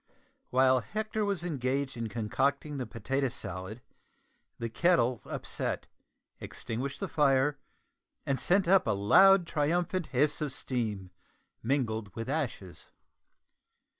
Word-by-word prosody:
While 130 0 +4
Hector 215 - -3
was 200 -4 -1
engaged 135 -4 -2
in 115 -2 -4
concocting 140 +6 -1
the 125 - -3
potato 135 +4 -1
salad 95 +1 -6 0.7
the 115 - -3
kettle 125 -2 +2
upset, - - -3 0.5
extinguished 130 +4 -5
the - - -2
fire, 140 -1 +2 0.7
and 135 -1 0
sent 190 0 +2
up 190 -4 +4
a 110 - +2
loud 190 - +6
triumphant 170 +3 0
hiss 145 +4 +1
of 145 -3 -2
steam 105 -9 -3 0.5
mingled 110 -6 -1
with 115 +2 -5
ashes. 120 - -4
135 Hz, 115 wpm, -30 LUFS, 115-155 Hz, 0.7 s, loud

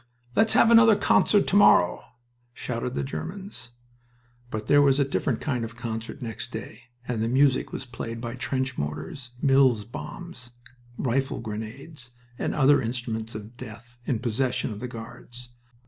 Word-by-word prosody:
"Let's 220 +1 +4
have 235 - +5
another 225 -2 +8
concert 205 0 +3
to - - 0
morrow!" 90 - +5 0.5
shouted 125 +1 -4
the - - -1
Germans. 170 - -7 0.8
But 110 -2 -4
there 145 +4 +5
was 140 0 +4
a 140 - +3
different 135 - -1
kind 130 -6 -1
of 115 +1 -6
concert 115 +1 -5
next 115 -4 -6
day, 115 +2 -8 0.2
and 120 -3 -2
the 115 - +1
music 130 +2 +3
was 135 - -5
played 115 -2 -6
by 115 0 -5
trench 130 0 -2
mortars, 125 - -5
Mills 135 -6 +4
bombs, 125 - -8 0.5
rifle 135 +2 -1
grenades, 120 +5 -7 0.3
and - - -1
other 145 0 +5
instruments 115 -2 -4
of 110 +2 -8
death 120 +2 -11
in 130 - +1
possession 125 +2 -1
of 105 - -6
the 125 - -4
Guards. 120 +1 -10
125 Hz, 155 wpm, -26 LUFS, 115-140 Hz, 0.8 s, another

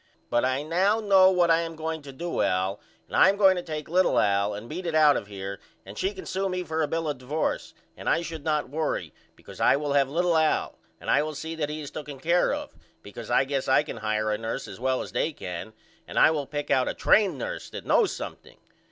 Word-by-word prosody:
But 120 - +2
I 130 +2 0
know 190 +7 +2
now 195 -3 +6
what 175 -2 +3
I 165 - +5
am 165 -1 -4
going 160 0 -4
to 140 -1 -10
do 170 +6 -3
Al 95 +2 0 0.3
and - - -6
I - - +7
am 200 - +1
going 195 -2 +6
to 180 - -2
take 155 -3 -6
little 180 +3 +2
Al 100 0 +2
and 105 +3 -8
beat 175 +5 -5
it 165 - -1
out 150 -2 +6
of 100 - -3
here 100 -1 -6 0.3
and 100 +2 -10
she 190 - -1
can 190 - -8
sew 195 +1 -2
me 180 0 -2
for 160 -1 -2
a 150 - +1
bill 165 +2 -2
of 145 -4 -3
divorce 145 +5 -2 0.2
and - - -4
I 170 - +2
should 165 -3 -7
not 150 -1 0
worry 155 +1 -2 0.2
because - - -12
I - - +5
will 145 0 -2
have 140 -2 +3
little 170 +3 +1
Al 160 -1 +1 0.2
and - - -2
I - - +4
will 155 0 -4
see 160 +3 -5
that 155 -2 -2
he 155 +1 -5
is 145 - -8
tooken 145 -3 -7
care 170 +5 +2
of - - -4 0.3
because 110 +3 -9
I 120 - +4
guess 135 0 -2
I 130 +2 +4
can 155 - -7
hire 110 0 -1
a 105 - -1
nurse 115 0 -4
as - - -10
well 130 +1 0
as - - -10
they 160 - -1
can 90 -1 -6 0.4
and - - -7
I - - +6
will 145 -4 -2
pick 145 -1 -4
out 130 - +3
a - - -4
train 210 -3 +3
nurse - - -5
that - - -8
knows 430 - +3
something. - - -8
150 Hz, 255 wpm, -26 LUFS, 130-170 Hz, 0.4 s, I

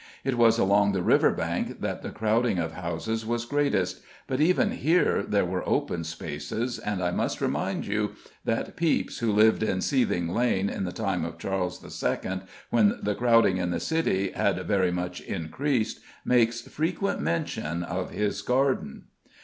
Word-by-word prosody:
It 135 -1 0
was 115 -1 +5
along 100 0 +3
the 95 -2 0
river - - +5
bank - - -2
that - - -3
the - - -5
crowding 110 0 +1
of 80 -1 -1
houses 85 +6 -3
was 120 +1 -2
greatest, 140 -8 0 0.2
but 130 +2 -1
even 180 +4 +3
here 165 +6 +2
there - - +1
were - - -2
open 85 - 0
spaces; 85 - -4
and 100 -3 -2
I 90 - +1
must - - -1
remind - - -1
you - - -1 0.3
that 115 - -2
Pepys, 165 -2 0
who 115 -2 +1
lived 110 +2 +4
in 100 -4 0
Seething 95 -9 +1
Lane 100 0 +1
in 95 - -3
the 90 - -3
time 95 -5 -1
of 85 0 -5
Charles 90 0 -3 0.2
II., 95 0 -1 0.3
when 110 -4 +4
the 105 - -1
crowding 115 -5 +4
in 90 -1 -1
the 85 -1 -1
City 95 - 0
had - - 0
very 95 -3 +2
much 90 0 -3
increased, 110 - -2 0.3
makes 120 -1 +3
frequent 170 - -2
mention 110 - -2
of 90 +2 -3
his 105 -1 -1
garden. 130 - 0
105 Hz, 165 wpm, -27 LUFS, 90-120 Hz, 0.3 s, was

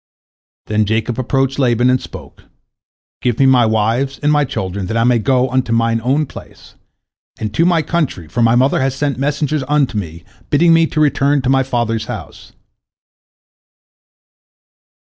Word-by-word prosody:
Then 105 0 0
Jacob 110 +3 -2
approached 135 +1 -1
Laban, 120 -2 +2
and 130 - +1
spoke, - - -12 0.8
"Give 120 -2 0
me 135 - +3
my 125 -3 +4
wives 115 +5 0
and 150 - +3
my 150 -1 +2
children, 95 -6 -4
that 110 - -2
I 115 - +2
may 120 0 +3
go 125 +3 +1
unto 130 -2 -1
mine 115 0 +1
own 140 +5 +1
place, - - -14 0.7
and 105 -1 -4
to 165 - +2
my 170 -3 +2
country, 150 - -2
for 100 +10 -3
my 115 0 +4
mother 130 +2 +2
has 135 0 -1
sent 140 -2 -2
messengers 145 +1 -1
unto 145 -7 +1
me, 85 -2 -8 0.3
bidding 165 +3 +4
me 165 0 +4
to 155 - -3
return 145 -1 +2
to 130 - +1
my 135 0 +3
father's 120 -4 -2
house." - - -9
130 Hz, 165 wpm, -16 LUFS, 115-140 Hz, 0.8 s, my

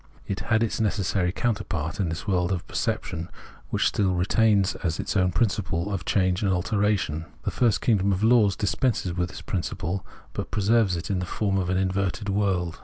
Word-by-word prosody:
It 100 +1 -3
had 110 0 +1
its 115 0 -1
necessary 100 -4 +1
counter 110 0 -1
part 80 +1 -4
in 95 -4 +1
this 80 - -5
world 90 -2 +1
of 90 -3 -2
perception, 80 +2 -2 0.4
which - - +1
still 95 -3 +1
retains 100 +2 +3
as 80 -3 -2
its - - -2
own 95 -2 +4
the - - -6
principle 100 -4 0
of 95 - -3
change 95 -2 +1
and 100 -2 +2
alteration. 90 -4 0 0.2
The - - -1
first 115 -5 +2
kingdom 100 -4 +2
of 95 +2 0
laws 110 -4 +5
dispenses 105 -3 0
with 90 0 -1
this - - -9
principle, 90 -2 -3 0.3
but - - -4
preserves 105 -2 +2
it 85 - -4
in 95 - 0
the 90 - -3
form 100 +1 0
of 90 -1 -2
an 95 - +1
inverted 95 +2 -1
world. 95 -4 0
95 Hz, 195 wpm, -26 LUFS, 90-105 Hz, 0.4 s, laws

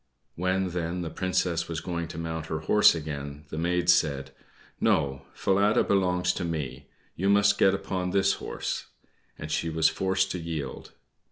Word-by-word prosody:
When, 95 +2 0
then, 90 0 -3
the 80 - -5
Princess 90 -2 0
was 80 -2 -3
going 85 0 -3
to 80 - -9
mount 80 -1 -4
her 80 -1 -3
horse 105 +4 +5
again, 75 -2 -6
the 80 - -6
maid 90 +1 0
said, 75 -6 +2 0.5
"No, 70 -1 +1
Falada 100 +2 +2
belongs 90 -2 +2
to 90 - -4
me; 70 -5 -4 0.3
you 95 +3 0
must 100 0 +4
get 95 0 +5
upon 95 -1 -3
this 100 +1 +3
horse:" - - -4 0.5
and 75 - -7
she 85 - 0
was 80 0 +3
forced 95 0 0
to 90 - -3
yield. 80 -4 -5
85 Hz, 165 wpm, -27 LUFS, 80-95 Hz, 0.5 s, horse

